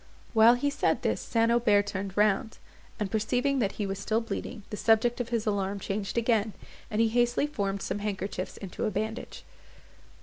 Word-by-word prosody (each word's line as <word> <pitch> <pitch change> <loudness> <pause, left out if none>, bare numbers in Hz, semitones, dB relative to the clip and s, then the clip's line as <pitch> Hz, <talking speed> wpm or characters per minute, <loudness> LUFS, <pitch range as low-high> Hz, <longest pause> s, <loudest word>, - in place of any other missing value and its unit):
While 225 +1 +7
he 285 +4 0
said - - 0
this - - 0
St. 230 0 +1
Aubert 210 -4 +4
turned 195 -1 -5
round, 210 +1 +2 0.4
and 205 -2 -2
perceiving 250 +6 +1
that 205 -4 0
he 210 - -3
was 195 0 -3
still 215 +3 0
bleeding, 225 0 -5
the - - -2
subject 230 +3 +3
of 240 - -5
his 230 -2 -1
alarm 200 -1 -1
changed 195 +2 -3
again, 225 -2 +2 0.4
and 210 - -2
he 225 0 +4
hastily 240 +3 +2
formed 200 -9 -2
some 200 - -2
handkerchiefs 195 -2 -4
into 195 +1 -5
a - - +1
bandage. 220 +3 -4
215 Hz, 180 wpm, -28 LUFS, 200-235 Hz, 0.4 s, While